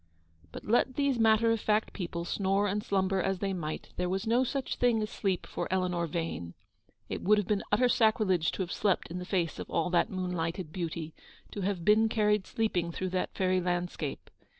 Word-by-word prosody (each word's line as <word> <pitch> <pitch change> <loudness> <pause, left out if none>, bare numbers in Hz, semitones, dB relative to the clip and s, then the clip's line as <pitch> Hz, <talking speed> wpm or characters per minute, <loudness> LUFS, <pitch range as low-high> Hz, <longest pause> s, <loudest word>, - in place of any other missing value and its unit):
But, - - -9
let 240 +3 +2
these 280 -4 +1
matter 225 0 +4
of 225 - +1
fact 215 +1 +1
people 170 -2 -4
snore 195 +2 +1
and 205 +1 -1
slumber 190 -1 +1
as 195 0 0
they 195 +1 -2
might, 155 -4 -4
there 180 0 0
was 190 +4 -1
no 235 +3 +3
such 265 +1 -2
thing 240 -2 +3
as 215 - -5
sleep 190 -3 -1
for - - -4
Eleanor 180 -2 0
Yane. 160 - -4 0.5
It - - -4
would 210 +2 +4
have 205 - +1
been 205 +1 0
utter 235 +5 +4
sacrilege 215 -8 +3
to 190 - -1
have 180 - -7
slept 200 -3 0
in 180 - -4
the 180 - -6
face 180 -4 -1
of - - -6
all 170 +1 0
that 175 - +3
moonlighted 180 -2 -3
beauty, 165 -3 -4 0.4
to 205 - -5
have 185 -3 -2
been 220 +1 +5
carried 210 -3 +2
sleeping 180 -7 -1
through 185 +2 -3
that 180 0 -2
fairy 185 -1 +2
landscape. 175 -4 -3
190 Hz, 200 wpm, -30 LUFS, 175-215 Hz, 0.5 s, been